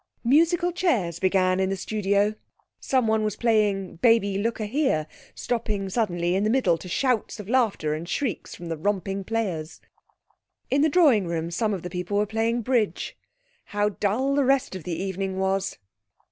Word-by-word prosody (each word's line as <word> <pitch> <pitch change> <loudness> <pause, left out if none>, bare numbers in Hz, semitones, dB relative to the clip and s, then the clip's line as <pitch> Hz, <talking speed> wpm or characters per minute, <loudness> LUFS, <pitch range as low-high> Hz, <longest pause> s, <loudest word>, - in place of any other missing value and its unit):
Musical 335 +7 +3
chairs 220 - 0
began 185 0 +2
in 190 0 +1
the 195 - -1
studio. 200 +1 0 0.5
Someone 220 -5 +1
was 210 -1 -1
playing 210 -5 +1
'Baby, 215 -1 +3
look 230 +3 -1
a 215 - -2
here,' 220 - 0 0.3
stopping 215 -5 -2
suddenly 175 -5 0
in 195 +2 +1
the 215 - +1
middle 225 -8 +3
to 180 +3 -9
shouts 245 +1 0
of 205 - -8
laughter 220 -11 +1
and 165 +3 -5
shrieks 250 -1 -3
from 175 - -10
the 165 -1 -3
romping 195 +2 -2
players. 190 -7 -3 0.9
In 275 +2 +3
the 310 - +4
drawing 280 - +4
room 170 0 -3
some 215 +5 0
of 190 -4 -3
the 180 - -5
people 180 +3 -2
were 210 - +2
playing 225 +2 -1
bridge. 240 -3 0 0.5
How 205 0 0
dull 215 +7 0
the 285 0 +3
rest 270 -6 +1
of 185 - -8
the 170 -2 -3
evening 190 0 -3
was! 190 0 -1
205 Hz, 175 wpm, -25 LUFS, 185-235 Hz, 0.9 s, the